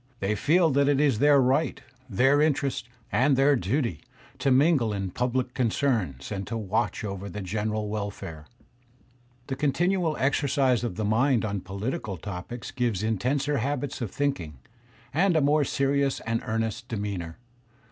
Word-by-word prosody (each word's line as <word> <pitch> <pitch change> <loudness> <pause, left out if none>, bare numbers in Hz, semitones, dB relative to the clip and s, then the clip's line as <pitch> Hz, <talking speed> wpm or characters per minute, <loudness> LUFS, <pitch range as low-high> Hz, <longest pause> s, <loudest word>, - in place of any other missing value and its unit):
They 100 +2 0
feel 160 - +3
that 140 +1 +3
it 140 -1 +3
is 140 -7 +2
their 145 0 +6
right, 135 +4 +2 0.3
their 135 +8 +3
interest, 140 -5 0 0.2
and 135 +2 +3
their 140 +1 +5
duty, 115 - -1 0.4
to 140 - +1
mingle 135 -3 +4
in 95 -2 -3
pubUc 125 +2 -1
concerns, 110 - -1
and 100 -2 -4
to 115 - -3
watch 110 +1 -1
over 100 -1 -5
the 105 0 -6
general 105 +2 -2
welfare. 100 -7 -5 1.0
The 135 - -3
continual 165 +4 +1
exercise 135 -2 +2
of 115 -7 -3
the 110 - -2
mind 115 +2 +2
on 100 -2 -2
political 100 - -4
topics 100 +7 -7
gives 115 -6 -1
intenser 135 +6 0
habits 140 +2 -2
of 115 - -2
think 140 +5 -1
ing, 75 -4 -8 0.6
and 175 +4 +3
a - - +5
more 145 +1 +3
serious 140 0 +1
and 115 0 -1
earnest 115 +2 -2
demeanour. 100 -7 -4
120 Hz, 155 wpm, -26 LUFS, 105-140 Hz, 1.0 s, their